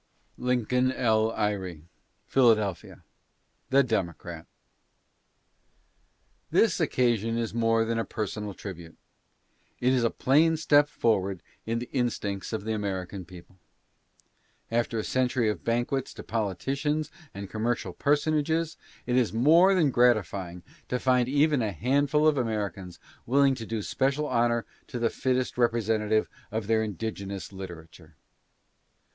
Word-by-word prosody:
LINCOLN 125 +1 +1
L. 110 -3 +2
EYRE: 95 -7 -2 0.4
Philadelphia. 110 -7 +1 0.7
THE 140 +1 +5
DEMOCRAT. 85 - -3 2.0
This - - +3
occasion 115 -2 +1
is 115 -2 -2
more 115 -1 +2
than 115 0 -1
a - - +1
personal 105 -2 -4
tribute. 85 -6 -9 0.8
It 125 +1 +2
is 125 -2 +2
a 115 - +3
plain 160 +7 +3
step 145 -1 +4
forward 100 - 0 0.2
in 115 +1 0
the 120 +1 -5
instincts 110 -6 -2
of 110 -3 -3
the 110 +1 -2
American 95 -3 -4
people. 90 +1 -14 1.1
After 115 0 0
a 110 - -1
century 125 -2 +1
of - - -7
banquets 120 +3 -1
to - - -8
politicians 135 - -2 0.2
and 100 0 -7
commercial 110 -2 -2
personages, 155 - +1 0.3
it 125 - 0
is 125 -7 +2
more 165 - +5
than 160 -7 +3
gratifying 100 -8 +1 0.3
to 125 - 0
find 125 -1 +2
even 145 0 +3
a 110 -2 -1
handful 140 - +2
of 150 -3 +3
Americans 100 -6 -3 0.3
willing 135 +2 +4
to 115 -4 -7
do 110 -2 -3
special 135 +6 0
honor 120 -3 +1 0.2
to - - -5
the 115 -1 +1
fittest 130 -1 -1
representative 110 -2 +1 0.2
of 110 0 -3
their 110 +1 +2
indigenous 100 -2 -5
literature. 85 -3 -10
115 Hz, 130 wpm, -27 LUFS, 100-130 Hz, 2.0 s, THE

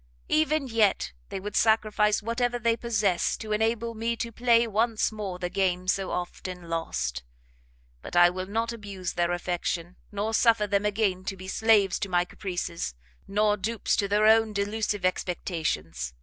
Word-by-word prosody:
Even 310 -2 +2
yet 210 - +2 0.2
they - - -4
would 205 +2 -6
sacrifice 215 -1 +3
whatever 245 +2 0
they 230 -1 +1
possess 210 -7 0
to 215 -1 -7
enable 225 +2 0
me 230 +1 -1
to 230 +1 -4
play 235 0 +3
once 225 +1 +1
more 205 -4 -5
the 180 -1 -3
game 185 -1 0
so 190 0 0
often 180 0 -5
lost; 65 - -2 0.8
but - - -8
I 175 0 +7
will 185 +1 -5
not 225 +3 -1
abuse 200 -5 -6
their 175 0 0
affection, 175 0 -3
nor 210 +2 -2
suffer 225 -2 +4
them 200 0 +1
again 200 -3 0
to 195 - -4
be 185 +1 -9
slaves 210 -2 +3
to 195 - -3
my 175 -1 +2
caprices, 175 - -4 0.3
nor 210 +1 +2
dupes 220 +3 -1
to 200 - +1
their 210 +2 +2
own 220 0 +5
delusive 205 -1 -1
expectations. 155 - -2
205 Hz, 165 wpm, -27 LUFS, 180-225 Hz, 0.8 s, I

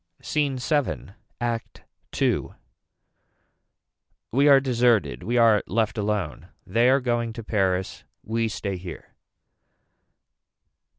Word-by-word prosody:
SCENE 145 -3 0
VII. 140 - -1 0.3
ACT 120 -2 -4 0.4
II. - - +1 1.8
We 140 +5 +3
are 140 -1 +8
deserted. 120 - +1
We 120 +2 -1
are 115 -3 +5
left 110 +1 0
alone. 100 -7 -2 0.2
They 120 +2 +3
are 135 +1 +4
going 120 -2 -1
to 115 0 -7
Paris. 95 -3 -1 0.2
We 115 +1 -1
stay 100 -3 -4
here. 90 -2 -10
115 Hz, 105 wpm, -25 LUFS, 100-125 Hz, 1.8 s, are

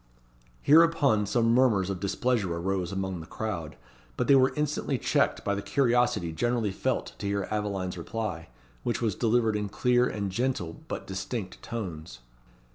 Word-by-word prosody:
Hereupon 145 -9 +5
some 115 +2 +2
murmurs 110 -7 +3
of 95 - -4
displeasure 100 -2 0
arose 90 +1 -2
among 95 -2 -3
the 80 - -9
crowd, 90 - -4 0.4
but - - +1
they 140 - +6
were 130 -1 +5
instantly 150 -2 -1
checked - - +1
by 100 - +1
the 100 - -2
curiosity 120 -8 +1
generally 115 +4 0
felt - - -2
to 100 - -3
hear 100 -1 -1
Aveline's 100 -4 -2
reply, 90 - -4 0.3
which 120 - -1
was 110 -4 0
delivered 115 -1 +2
in 105 -1 -2
clear 125 +3 +2
and 100 -2 -3
gentle, 110 -7 -2
but - - -5
distinct 95 +1 -5
tones. 80 - -6
105 Hz, 155 wpm, -28 LUFS, 95-120 Hz, 0.4 s, they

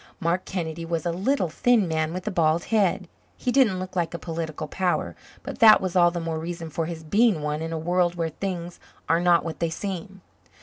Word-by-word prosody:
Mark 175 0 0
Kennedy 170 -3 -4
was 165 0 -3
a 170 - +1
little, 190 +4 0
thin 220 +4 +2
man 160 -1 -1
with 180 +1 -5
a 215 - -1
bald 165 -2 +2
head. 195 -3 +2 0.3
He 250 - -1
didn't 245 -8 +3
look 185 0 -6
like 170 -1 -1
a - - -2
political 160 -2 -5
power, 180 +3 -1 0.3
but - - -7
that 220 -3 +8
was 185 -1 -3
all 175 -1 +6
the 175 0 -4
more 165 -1 -3
reason 165 0 -6
for 160 +1 -2
his 165 -1 -6
being 200 0 +2
one 150 +1 -2
in 165 0 -4
a 165 - -2
world 175 +2 +1
where 165 -2 -1
things 175 -1 -5 0.3
are 165 - +3
not 175 -1 +3
what 165 - -5
they 170 - 0
seem. 190 +2 -6
175 Hz, 220 wpm, -25 LUFS, 165-185 Hz, 0.3 s, that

